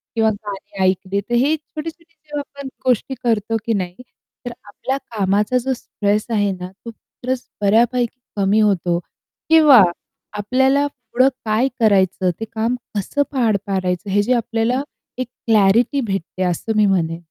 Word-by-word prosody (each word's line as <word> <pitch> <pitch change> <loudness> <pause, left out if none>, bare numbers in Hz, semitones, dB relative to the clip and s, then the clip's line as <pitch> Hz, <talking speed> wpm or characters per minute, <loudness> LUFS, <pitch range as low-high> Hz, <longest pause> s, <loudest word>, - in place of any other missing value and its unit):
किंवा 220 -1 +3
गाणी 200 -2 -5
ऐकले 190 +1 -2
तर 240 - -7
हे 300 +3 +3
छोटे-छोटे 325 +2 -9
जेव्हा 300 -2 -6 0.2
आपण 275 - -5 0.2
गोष्टी 255 +2 +1
करतो 225 -1 +1
की 230 - +1
नाही 185 -3 -2 0.5
तर 245 - -3
आपल्या 260 +6 -3
कामाचा 210 -1 0
जो 260 +2 0
स्ट्रेस 210 -3 -1
आहे 205 -3 +1
ना, 180 -1 -6
तो 230 - -5
स्ट्रेस 250 +3 -6 0.2
बऱ्यापैकी 235 +4 +2 0.2
कमी 200 +2 +2
होतो 180 -5 +2 0.5
किंवा 305 -8 +8 0.6
आपल्याला 265 +7 +2
पुढं 250 -1 0 0.2
काय 220 +5 +2
करायचं, 190 -4 +3
ते 225 - -3
काम 225 +2 -1 0.2
कसं 205 +8 -1
पार 230 -6 +2
पाडायचं. 190 -1 -2
हे 205 +2 +3
जे 245 +5 +2
आपल्याला 235 +2 0 0.4
एक 255 - -2 0.2
क्लॅरिटी 225 +6 +4
भेटते 195 -4 -3
असं 185 +5 -1
मी 210 - +5
म्हणेन. 170 -4 +1
220 Hz, 150 wpm, -20 LUFS, 195-255 Hz, 0.6 s, किंवा